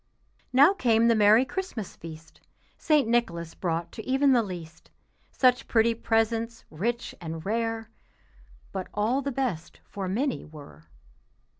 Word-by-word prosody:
Now 285 +9 +6
came 230 - +3
the 230 - +4
merry 215 +4 +5
Christmas 285 - -5
feast; 160 -1 -12 0.3
St. 300 -6 +2
Nicholas 170 -9 0
brought 170 -1 -3
to 220 +2 -8
e'en 270 +1 +4
the 245 -2 +5
least 175 -6 -8 0.4
Such 250 -1 +2
pretty 230 0 +3
presents, 230 0 -1
rich 230 +9 -3
and 160 -1 -6
rare, 225 +1 -2 0.8
But 190 -1 -4
all 225 +6 +1
the 280 +1 -3
best 240 -12 -3
for 195 -2 -6
Minnie 250 +8 -1
were. 150 -2 -13
225 Hz, 135 wpm, -27 LUFS, 180-245 Hz, 0.8 s, Now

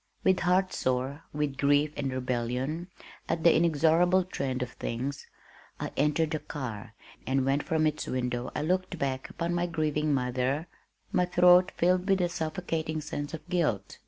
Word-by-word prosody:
With 190 -1 +3
heart 185 +1 +2
sore 130 +4 -1
with 145 -2 -2
grief 145 +1 +3
and 135 -2 -2
rebellion 130 +6 -2 0.4
at 165 0 -1
"the 170 - +6
inexorable 170 +3 +4
trend 135 -8 -3
of 125 - -7
things," 130 +4 -4 0.5
I - - -4
entered 150 +2 +1
the 155 - -1
car, 115 -8 -6 0.3
and 130 0 +1
when 135 +1 +2
from 155 +1 0
its 155 0 -1
window 125 -1 -2
I - - -1
looked 185 +2 -1
back 135 -3 -2
upon 170 +1 -2
my 175 0 0
grieving 155 -2 0
mother, 130 +3 0 0.5
my 180 -1 +2
throat 180 +1 +5
filled 180 +2 +2
with 195 -1 +4
a 175 -1 +1
suffocating 160 -1 -3
sense 145 0 -4
of 155 -1 -12
guilt. 135 - -1
155 Hz, 160 wpm, -29 LUFS, 130-175 Hz, 0.5 s, the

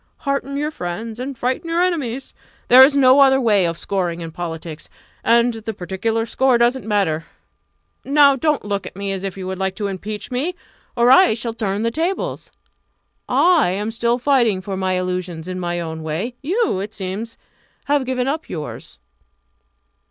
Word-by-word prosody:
Hearten 275 0 -2
your 300 +2 -1
friends, 220 - -5
and 260 +1 -5
frighten 255 +8 -2
your 335 +2 +2
enemies 275 -8 -2 0.4
there 255 +1 +10
is 280 +2 +5
no 265 0 +6
other 270 -1 +6
way 210 -7 +3
of 165 0 -3
scoring 175 -2 -2
in 165 -1 -6
politics 165 -2 -7 0.3
and 235 +1 +4
the 225 -1 -6
particular 220 +5 -2
score 260 +1 +2
doesn't 240 -1 +1
matter. 175 -7 0 0.8
Now 280 0 +5
don't 300 -2 0
look 200 -1 -3
at - - -10
me 200 0 -3
as 190 -1 -4
if 195 -1 -4
you 190 - -6
would 190 0 -4
like 190 0 -1
to 205 - -4
impeach 205 +2 -5
me! 290 +9 -2 0.4
or 240 +1 +5
I 365 -5 +6
shall 230 0 -4
turn 210 -2 -2
the 230 - 0
tables. 360 - -3 0.8
I 345 - +4
am 205 +4 -2
still 235 +1 0
fighting 245 -6 +2
for 190 +1 -5
my 190 0 -1
illusions 180 -2 -3
in 185 0 -4
my 175 -1 -2
own 160 -1 -5
way 160 +10 -3
you, 370 - 0
it 205 +3 -6
seems, 200 +4 -5 0.5
have 285 -1 +2
given 255 0 -1
up 310 +4 -3
yours!" 150 - -7
225 Hz, 175 wpm, -20 LUFS, 185-265 Hz, 0.8 s, there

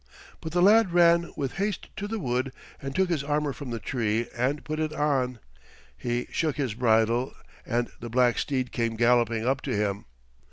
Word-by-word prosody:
But 160 - -6
the 175 +1 +2
lad 210 -2 +5
ran 170 -1 +4
with 135 +1 -3
haste 200 0 -2
to 205 - -3
the 225 +1 -3
wood 130 - -1 0.3
and 135 -1 -5
took 190 -1 +2
his 155 -5 0
armor 145 0 0
from 140 -1 -8
the 115 - -3
tree 115 +1 -1
and 130 +5 0
put 155 0 -4
it 155 -1 -1
on. 135 -5 0 0.6
He 120 0 -2
shook 155 -3 0
the 135 -7 -1
bridle, 115 +1 +2 0.3
and 120 0 -1
the 120 - -7
black 120 0 +3
steed 130 -3 -1
came 115 -2 -1
galloping 115 -1 +2
up 135 +2 +1
to 130 - -2
him. 100 -1 -1
130 Hz, 190 wpm, -27 LUFS, 120-155 Hz, 0.6 s, lad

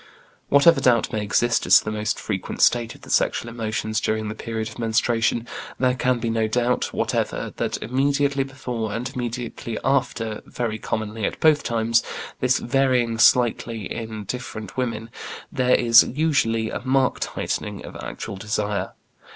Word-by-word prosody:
Whatever 150 +4 +6
doubt 120 -3 +3
may 110 - 0
exist 115 +3 +1
as - - +9
to - - 0
the 105 - -2
most 105 0 -2
frequent 95 -4 -2
state 120 -1 +3
of - - -17
the - - -9
sexual 120 - +1
emotions 110 -2 -2
during 110 -1 -1
the - - -3
period 110 0 -4
of 110 - -12
menstruation, 115 +1 +1 0.3
there 125 -1 +3
can 125 0 +1
be 115 -1 -2
no 110 -1 +1
doubt 120 +2 0
whatever - - -2
that - - -2
immediately 140 +2 +1
before 125 -5 -4
and 125 +4 -3
immediately 120 -2 -4
after, 120 -5 0
very 115 -3 -3
commonly 110 0 -3
at - - -2
both 155 -2 +4
times, 115 -1 +1 0.4
this 130 +1 +3
varying 125 -3 +1
slightly 115 -2 +3
in 110 -2 -5
different 110 -2 -6
women, 115 -3 -3 0.4
there 125 -3 +3
is 115 -1 +7
usually 125 -7 0
a - - -3
marked 130 0 +1
heightening - - -4
of - - -10
actual 95 - -6
desire. 105 0 -2
115 Hz, 160 wpm, -23 LUFS, 110-125 Hz, 0.4 s, as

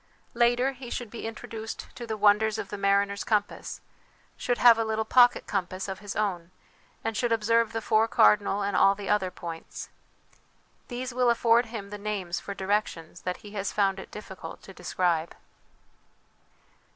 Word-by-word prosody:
Later, 240 +2 +3
he 255 -2 -10
should 240 -3 -5
be 230 - -5
introduced 225 0 -7
to 240 - -7
the 220 -1 -3
wonders 210 +1 +4
of - - -5
the 205 - -5
mariner's 200 0 +2
compass, 210 -2 -1 0.5
should 245 -1 -1
have 235 -2 +7
a - - +2
little 220 0 -1
pocket 245 +2 +5
com 195 -3 -1
pass 185 +2 -6
of 190 -1 -5
his 205 -1 -7
own, 185 -5 -1 0.5
and 225 0 -2
should 240 +1 0
observe 230 0 +2
the 225 -1 -3
four 220 +1 +3
cardinal 205 -2 +4
and 200 -1 -1
all 195 +2 +5
the 200 -1 -6
other 195 -3 +2
points. 165 -2 -8 1.0
These 250 0 -5
will 250 0 +3
afford 235 0 +4
him 210 -3 -7
the 210 - -6
names 200 -4 -3
for 200 - -7
directions 190 -4 -2
that 180 0 -3
he 205 - -9
has 200 -1 -3
found 195 -2 +1
it - - -9
difficult 195 -3 -9
to 195 - -11
describe. 170 -3 -1
210 Hz, 175 wpm, -27 LUFS, 195-230 Hz, 1.0 s, have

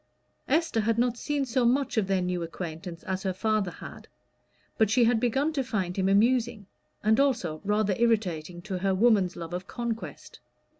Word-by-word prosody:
Esther 305 -5 +1
had 225 +1 +1
not 240 0 +2
seen 285 +3 -2
so 250 0 0
much 265 +4 +2
of 215 -4 +1
their 190 -2 +1
new 180 -1 -2
acquaintance 165 0 -6
as 190 0 -3
her 190 -1 -1
father 215 0 0
had. - - -11 0.7
But 220 -2 +4
she 240 +3 +4
had 230 0 +3
begun 270 +6 +1
to 275 -3 0
find 190 -7 -2
him 190 -1 +1
amusing, 230 +1 +2 0.4
and 220 +2 +3
also 235 - +1
rather 210 0 +1
irritating 180 -7 0
to 190 -2 -4
her 190 0 +1
woman's 200 -4 +3
love 165 0 -7
of 180 +1 -5
conquest. 235 -2 -6
215 Hz, 180 wpm, -27 LUFS, 185-240 Hz, 0.7 s, But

